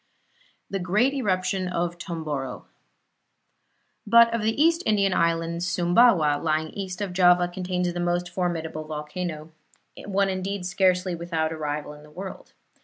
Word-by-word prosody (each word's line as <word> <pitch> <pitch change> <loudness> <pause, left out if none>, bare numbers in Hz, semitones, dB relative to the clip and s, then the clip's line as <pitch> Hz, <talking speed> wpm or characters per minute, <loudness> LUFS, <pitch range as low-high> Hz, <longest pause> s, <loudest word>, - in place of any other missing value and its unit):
THE 195 - -3
GREAT 210 +9 +2
ERUPTION 190 -6 -1
OF 175 -1 -2
TOMBORO 150 -7 -5 1.4
But 230 +2 +6
of 230 - 0
the 220 +4 -1
East 330 +2 +4
Indian 200 -3 +2
Islands 170 +1 0
Sumbawa, 175 -4 +3
lying 155 0 0
east 190 -1 -6
of 195 -3 -3
Java, 180 -1 +5
contains 180 0 -2
the 175 - -4
most 175 0 0
formidable 165 -4 -3
volcano 155 +1 -5 0.5
one 200 0 +1
indeed 190 0 -3
scarcely 180 0 +1
without 165 -2 -2
a - - -4
rival 150 -1 -4
in 150 - -14
the 150 - -16
world. 190 +5 -9
180 Hz, 140 wpm, -25 LUFS, 165-195 Hz, 1.4 s, But